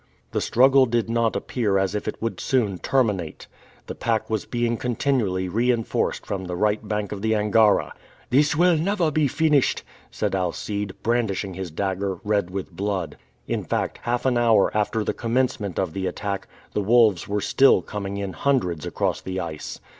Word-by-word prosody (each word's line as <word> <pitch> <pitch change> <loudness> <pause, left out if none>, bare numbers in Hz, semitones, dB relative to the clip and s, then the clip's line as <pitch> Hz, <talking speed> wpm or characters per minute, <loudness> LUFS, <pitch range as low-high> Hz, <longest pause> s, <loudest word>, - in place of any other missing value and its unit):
The - - -1
struggle 130 +2 +5
did 115 -1 0
not 115 -1 +1
appear 105 -6 0
as 95 0 0
if 105 - -3
it 110 - -4
would 115 0 -3
soon 105 -9 0
terminate. 105 - 0 0.4
The - - -6
pack 115 -1 -1
was 110 -4 -1
being 120 -1 0
continually 115 -6 0
reinforced 115 +4 0
from 95 -2 -4
the 90 0 -4
right 105 +3 0
bank 105 -1 -2
of 100 - -5
the 110 +1 +1
Angara. 105 0 +3 0.4
"This 145 +4 +4
will 175 +2 +4
never 175 -1 +1
be 150 -1 +2
finished!" 150 -1 +2 0.3
said - - -2
Alcide, 95 +2 -2
brandishing 110 -5 0
his 95 0 -5
dagger, 95 +3 -2
red 105 -4 0
with 95 0 -5
blood. 95 -3 -3 0.3
In - - -2
fact, - - -2
half 120 +1 -2
an 125 -2 +2
hour 115 -5 +3
after 105 +1 0
the - - -1
commencement 115 - -1
of 80 - -1
the 95 -1 -2
attack, 100 0 -4 0.3
the 105 - 0
wolves 110 -4 +4
were 105 +1 -1
still 135 +6 +4
coming 100 -1 -5
in 100 -2 -4
hundreds 90 - 0
across - - -1
the 95 0 -4
ice. 80 -4 -6
105 Hz, 175 wpm, -24 LUFS, 95-120 Hz, 0.4 s, struggle